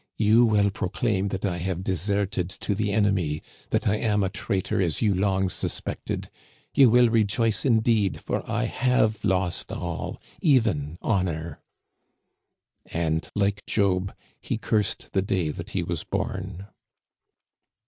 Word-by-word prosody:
You 110 +3 +5
will 105 -2 +3
proclaim 100 +1 -1
that 95 0 -3
I 90 -3 -1
have 90 +1 -3
deserted 95 0 -1
to 105 - 0
the 105 +1 -1
enemy, 95 -7 +1 0.3
that - - 0
I 105 - +3
am 105 -2 +1
a 95 - +1
traitor 95 -1 -1
as 85 0 0
you 105 -2 +3
long 95 0 +1
suspected. 95 - -3 0.4
You 135 -3 +7
will 120 +1 +6
rejoice 115 +1 +1
indeed, 110 -5 +2
for - - -2
I - - 0
have 120 -4 +1
lost 95 -3 0
all, 85 -2 -4 0.2
even 105 - +2
honor." 85 -6 -1 1.3
And 80 -1 -1
like 100 0 0
Job, 95 -2 +1 0.3
he - - -2
cursed 105 -3 -1
the 95 - +3
day 95 -5 0
that - - -7
he - - -1
was - - -3
born. 95 0 -4
100 Hz, 140 wpm, -25 LUFS, 90-110 Hz, 1.3 s, You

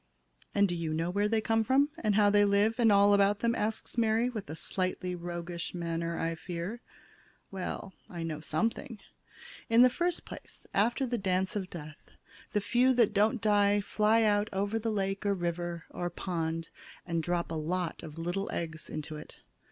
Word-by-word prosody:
"And 200 0 +5
do 175 - -2
you 165 -2 -2
know 165 +2 -1
where 205 +2 +1
they 220 0 +1
come 225 +1 +2
from, 270 +5 +3
and 215 -3 +1
how 205 -1 +5
they 205 0 +5
live, 205 +3 +2
and 225 -2 +5
all 200 0 +6
about 200 0 +3
them," 235 0 +2
asks 220 +2 -2
Mary, 230 +2 +2
with 215 -9 -6
a 155 - -5
slightly 185 +1 -2
roguish 175 0 -5
manner, 170 -1 -2
I 165 0 -1
fear. 175 +7 -5 0.7
"Well, 190 0 -5 0.2
I 170 -2 -5
know 160 -2 -3
something. 225 +8 -2 0.7
In 230 +2 +7
the 250 - +6
first 345 +5 -1
place, - - -11
after 235 +6 +2
the 240 -2 -2
dance 190 0 0
of 190 -3 -3
death, 155 -3 -9 0.5
the 210 - +2
few 250 +5 +3
that 235 -4 +4
don't 215 +3 +2
die 205 -1 +4
fly 215 +2 +2
out 210 0 +2
over 200 +3 -1
the 225 +1 -2
lake 195 -1 -1
or 200 -1 +1
river 175 -1 -3
or 175 0 -3
pond 165 -2 -3 0.4
and 170 -1 -1
drop 170 +1 -1
a - - -2
lot 165 +2 -2
of 155 -1 -9
little 175 +4 -2
eggs 160 -2 -5
into 155 0 -5
it. 150 - -11
195 Hz, 185 wpm, -30 LUFS, 170-215 Hz, 0.7 s, In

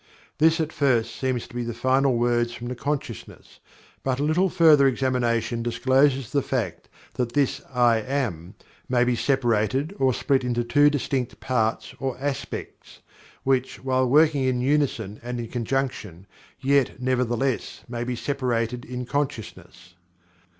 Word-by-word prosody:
This 160 +2 +4
at 160 0 -2
first 120 -5 +1
seems 130 -3 -2
to - - -17
be 120 - -3
the 120 -1 -5
final 130 +1 +2
words 120 0 +1
from 120 0 -6
the 125 - -4
consciousness, 135 -4 -5 0.4
but 130 -1 -1
a - - 0
little 170 +5 +2
further 155 -5 +6
examination 120 -3 0
discloses 130 +2 +2
the 140 - +2
fact 110 -12 -3 0.2
that 120 -2 -2
this 140 -1 +1
"I 120 -2 +4
Am" 110 - -3 0.3
may 125 -1 +3
be 125 0 +1
separated 130 - 0
or 130 -1 +3
split 135 +2 +1
into 120 -1 0
two 145 +5 +4
distinct 135 -3 -2
parts, 115 -4 -1
or 135 -2 -3
aspects, 140 0 -6 0.4
which 130 -1 0
while 130 -1 +1
working 150 0 +4
in 130 -1 +1
unison 125 -6 0
and 120 0 -5
in 115 -1 -5
conjunction, 120 -7 -3 0.3
yet, 140 -1 +1
nevertheless, 125 0 -1
may 120 0 -4
be 125 0 -3
separated 125 -3 -2
in 125 0 -5
consciousness. 120 -9 -5
125 Hz, 145 wpm, -24 LUFS, 120-135 Hz, 0.4 s, further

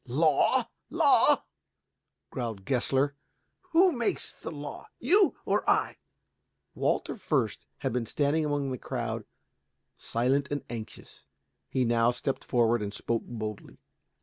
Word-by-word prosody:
"Law, 150 +4 +3 0.2
law?" - - +4 0.9
growled 110 -6 -4
Gessler. 135 +2 +1 0.6
"Who 360 +3 +5
makes 240 -6 -2
the - - -8
law, 145 -2 -7
you 380 - +4
or - - +1
I?" - - +2 0.8
Walter - - 0
Fürst 150 - -1
had - - -2
been 120 -2 -1
standing 150 +5 +1
among 145 -2 -1
the 130 - -4
crowd - - -3 0.7
silent 130 +4 +1
and 145 0 -2
anxious. 110 -2 -9 0.5
Now 120 -2 +3
he 125 - -9
stepped 135 +1 -2
forward 120 -2 +2
and 100 -1 -3
spoke 115 +2 -2
boldly. 110 -3 -6
130 Hz, 120 wpm, -29 LUFS, 115-145 Hz, 0.9 s, Who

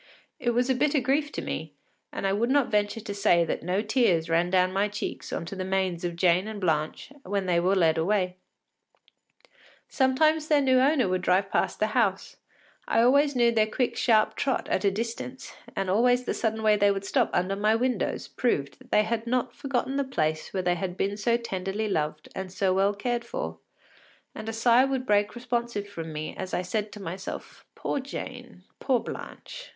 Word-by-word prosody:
It 240 -1 0
was 245 +1 +2
a 265 - +3
bitter 285 +3 +2
grief 280 +4 0
to - - -4
me, - - -5 0.4
and - - -4
I 195 - +2
would 230 +4 +1
not 280 -1 +2
venture 210 +1 0
to 205 -1 -5
say 195 -4 +3
that - - -3
no 185 +5 -1
tears 190 -8 +2
ran 170 +2 +2
down 185 0 +2
my 200 +2 +2
cheeks 205 0 -5
on - - -3
to 185 - -7
the 190 - -3
manes 185 -2 -1
of 175 -1 -2
Jane 180 +3 +3
and 215 -1 -6
Blanche 160 - -1
when 200 -4 -2
they 175 -2 +2
were 185 +3 +2
led 165 -3 +3
away. 185 +1 0 1.5
Sometimes 305 +4 +2
their 300 -2 +4
new 260 -2 +4
owner 270 -3 +3
would 185 0 0
drive 190 +2 +2
past - - 0
the 215 - +3
house; 200 -6 0 0.5
I - - +2
always 280 +3 +4
knew 240 -1 +4
their 220 -2 +2
quick, 245 +3 -1
sharp 220 -1 +3
trot 270 - -1
at - - 0
a 200 - +4
distance, 230 +5 -5 0.2
and 195 - -1
always 245 +6 +3
the - - -2
sudden 220 -1 -1
way 215 -1 +4
they 205 0 +4
would 195 0 -1
stop - - +2
under 185 +2 0
my 210 +2 +2
windows 250 +2 -1
proved 145 - -1
that 255 -1 -18
they 210 - +4
had 230 +1 -2
not 250 0 0
forgotten 270 0 -2
the 280 - +2
place 155 - -2
where 190 -1 -2
they 175 0 +2
had 180 +1 -4
been 200 +1 0
so 235 +3 +1
tenderly 200 -1 -3
loved 155 -4 -2
and 190 -1 -5
so 190 0 +1
well 195 +2 +2
cared 240 +3 -2
for, - - -5 0.7
and 220 +1 -6
a - - -1
sigh 235 +2 +4
would 265 -1 -1
break 205 -1 +2
responsive 235 -4 -2
from 165 -5 -7
me 155 0 -5
as 185 - -4
I 180 - -1
said 210 +3 -2
to 210 - -9
myself: 190 0 -7
“Poor - - -2
Jane, 250 -6 -8 0.2
poor 255 -3 +2
Blanche! - - -8
210 Hz, 205 wpm, -27 LUFS, 185-245 Hz, 1.5 s, their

